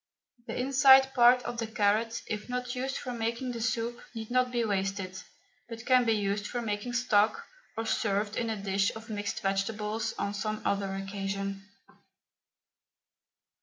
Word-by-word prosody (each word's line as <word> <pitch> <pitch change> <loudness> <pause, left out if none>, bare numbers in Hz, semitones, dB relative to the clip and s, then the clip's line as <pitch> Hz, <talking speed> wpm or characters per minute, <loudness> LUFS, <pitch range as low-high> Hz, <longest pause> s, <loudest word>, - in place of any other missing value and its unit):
The - - -4
inside 265 0 +6
part 245 0 +6
of 240 -1 -5
the 225 - -2
carrot, 220 +1 +1
if 215 +2 -5
not 250 0 -3
used 265 +1 -2
for 250 - -5
making 235 +2 -2
the 235 -1 -5
soup, 230 +1 -1
need 225 0 -6
not 255 0 +3
be 240 -2 0
wasted, 195 -2 -2 0.5
but 230 0 -8
can 255 -1 +5
be 225 - +3
used 205 0 -1
for 245 - -3
making 225 +1 -3
stock, 245 - +2 0.3
or 225 - -2
served 205 -1 0
in 230 - -1
a 220 - -2
dish 195 0 +1
of 220 0 -9
mixed 215 +1 -3
vegetables 210 +3 -1
on 200 - -2
some 215 +1 -3
other 200 -1 0
occasion. 195 0 -4
220 Hz, 160 wpm, -29 LUFS, 205-240 Hz, 0.5 s, inside